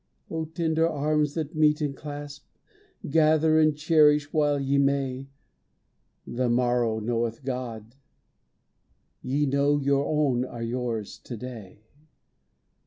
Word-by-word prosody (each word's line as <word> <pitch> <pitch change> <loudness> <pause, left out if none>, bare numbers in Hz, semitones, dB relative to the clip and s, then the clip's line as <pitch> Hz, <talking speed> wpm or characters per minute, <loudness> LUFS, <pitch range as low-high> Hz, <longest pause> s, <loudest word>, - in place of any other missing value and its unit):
O 160 0 -2
tender 160 0 0
arms 150 -1 0
that 155 -3 -3
meet 150 -1 +3
and 145 -3 -2
clasp! 145 0 -8 0.6
Gather 155 +1 +3
and 155 -1 +3
cherish 150 -2 +3
while 145 -2 +2
ye 140 +1 +1
may. 135 -1 0 1.0
The 125 0 -1
morrow 120 -2 +1
knoweth 115 +2 -2
God. 120 -4 -5 1.3
Ye 140 +3 0
know 140 +1 +2
Your 140 0 +1
own 145 -5 +1
are 120 -2 -6
yours 115 -3 -4
to 120 - -8
day. 110 -4 -10
140 Hz, 115 wpm, -26 LUFS, 125-150 Hz, 1.3 s, meet